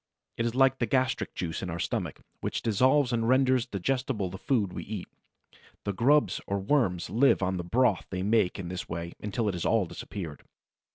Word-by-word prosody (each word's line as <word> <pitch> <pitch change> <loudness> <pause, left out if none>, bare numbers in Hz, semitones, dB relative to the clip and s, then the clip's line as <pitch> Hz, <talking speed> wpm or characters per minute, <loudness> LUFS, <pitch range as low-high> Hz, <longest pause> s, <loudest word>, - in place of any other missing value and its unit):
It 115 - 0
is 115 - -3
like 135 0 +4
the 120 - +1
gastric 130 -1 0
juice 80 -3 -3
in 95 - -4
our 85 - -3
stomach, - - -3 0.2
which - - -3
dissolves 130 +4 +3
and 115 0 +1
renders 130 -2 +3
digestible 110 -1 -1
the 95 - -7
food 105 -6 0
we - - -4
eat. 100 -3 -6 0.8
The 100 - -2
grubs 145 +9 +3
or 100 - 0
worms 100 -4 +1
live 125 -3 +4
on 95 0 0
the 90 - -3
broth 115 +2 +2
they 95 -1 -3
make 105 -2 +2
in 90 -3 -5
this 90 0 -5
way 85 +1 -4
until 105 +2 -1
it 100 - 0
has 85 - -3
all 110 -4 +2
disappeared. 85 -3 -7
105 Hz, 195 wpm, -28 LUFS, 90-130 Hz, 0.8 s, like